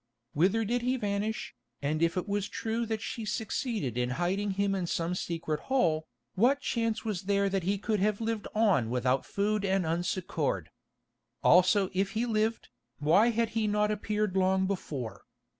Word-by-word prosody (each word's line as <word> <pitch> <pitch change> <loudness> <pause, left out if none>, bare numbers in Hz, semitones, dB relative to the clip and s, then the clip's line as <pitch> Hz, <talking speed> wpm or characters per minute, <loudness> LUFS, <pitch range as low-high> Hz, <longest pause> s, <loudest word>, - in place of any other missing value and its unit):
Whither 195 +9 +2
did 240 +3 0
he 250 +2 0
vanish, 210 0 -2 0.3
and 150 +2 -1
if 170 +2 +2
it 180 - -2
was 205 0 -1
true 230 +1 -2
that 220 -1 -2
she 235 -3 -4
succeeded 215 - -2
in 125 0 0
hiding 190 +4 0
him 200 0 +2
in 185 -3 -1
some 170 +1 -1
secret 165 -4 -2
hole, 160 -12 +2 0.3
what 255 +8 +3
chance 230 -4 -1
was 195 -4 -3
there 200 0 +3
that 195 0 0
he 195 +4 0
could 210 +1 -1
have 210 +1 +1
lived 225 -1 -2
on 200 - +3
without 125 +2 0
food 210 +1 0
and 195 -2 +1
unsuccoured? 160 - -1 0.7
Also 185 +2 +5
if 195 +3 0
he 225 +2 0
lived, 220 -1 0 0.3
why 180 +10 +4
had 230 -1 +1
he 225 -1 0
not 210 0 +2
appeared 210 -1 -1
long 190 0 +3
before? 135 - -4
200 Hz, 170 wpm, -30 LUFS, 175-220 Hz, 0.7 s, Also